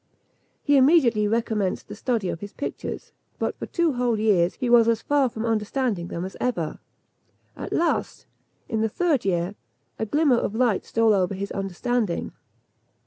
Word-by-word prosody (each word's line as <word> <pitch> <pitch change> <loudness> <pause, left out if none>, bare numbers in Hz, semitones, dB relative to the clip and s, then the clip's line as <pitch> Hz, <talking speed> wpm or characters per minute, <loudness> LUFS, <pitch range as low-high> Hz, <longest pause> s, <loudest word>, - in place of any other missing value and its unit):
He 285 -1 +4
immediately 260 -7 +4
recommenced 215 -3 -1
the - - -8
study 225 -3 -1
of - - -4
his 205 +2 -8
pictures; - - -6 0.3
but - - -2
for - - -5
two 340 -4 +1
whole 245 -3 0
years 190 -5 +2
he 255 - -3
was 235 -1 +6
as 230 -1 +1
far 285 -3 +2
from 225 0 -5
understanding 220 -3 -1
them 170 +1 -4
as 190 - -8
ever. 180 -11 -2 0.8
At - - -7
last, 335 0 -1 0.4
in 220 -3 -1
the 220 - +1
third 310 - 0
year, 175 0 0 0.5
a 220 - -1
glimmer 290 +1 +3
of 215 - -2
light 235 -4 +1
stole 225 -1 +3
over 190 -1 +1
his 200 +1 -5
understanding. 195 +1 -2
225 Hz, 165 wpm, -24 LUFS, 200-250 Hz, 0.8 s, was